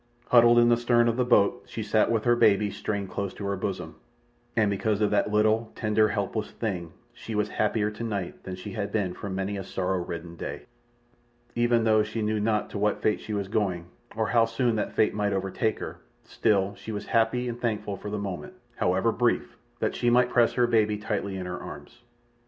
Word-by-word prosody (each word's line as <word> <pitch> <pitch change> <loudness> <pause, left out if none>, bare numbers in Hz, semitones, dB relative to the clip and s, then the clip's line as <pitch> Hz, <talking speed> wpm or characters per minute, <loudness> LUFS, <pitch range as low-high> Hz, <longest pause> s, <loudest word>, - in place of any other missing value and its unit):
Huddled 120 -1 +6
in 120 0 +6
the 120 - +4
stern 120 0 +3
of 115 - +1
the 125 - +2
boat 120 0 +3
she 110 - -5
sat 110 +1 +2
with 115 -2 +1
her 120 0 +4
baby 105 -2 +3
strained 100 -3 -3
close 100 0 -3
to 100 - -6
her 100 0 -1
bosom, 90 -4 -4 0.6
and 110 -3 +3
because 105 +1 0
of 105 -1 +2
that 105 0 +2
little 110 +2 +2
tender, 110 0 +2
helpless 105 +1 -2
thing 90 -7 -4 0.2
she 110 - -7
was 105 0 0
happier 105 0 0
tonight 105 -4 -4
than 95 - -6
she 90 - -8
had 105 -3 -3
been 100 -5 -1
for 100 - -7
many 95 +1 -2
a 95 - -4
sorrow 95 0 -1
ridden 85 0 -7
day. - - -6 0.9
Even 120 -1 +2
though 110 -1 +4
she 110 +1 -3
knew 105 0 0
not 105 0 0
to 100 - -4
what 105 0 +1
fate 105 - +1
she 110 - -6
was 100 -2 -2
going, 95 -5 -1 0.3
or 110 -1 0
how 115 -2 +4
soon 115 +1 0
that 105 - -2
fate 110 - +2
might 105 -1 0
overtake 95 +3 -1
her, - - -7 0.2
still 100 -2 +1
was 100 - -16
she 110 - -7 0.2
happy 115 +2 +2
and 120 0 -5
thankful 105 -3 -2
for 105 - -7
the 105 - -3
moment, 100 - -5 0.2
however 95 +6 +2
brief, 120 +1 0 0.2
that - - -1
she 120 - +1
might 125 +1 +4
press 120 -2 +4
her 125 - +3
baby 110 -3 +2
tightly 105 -2 -3
in 90 - -5
her 90 0 -5
arms. 120 - -10
105 Hz, 210 wpm, -27 LUFS, 100-115 Hz, 0.9 s, Huddled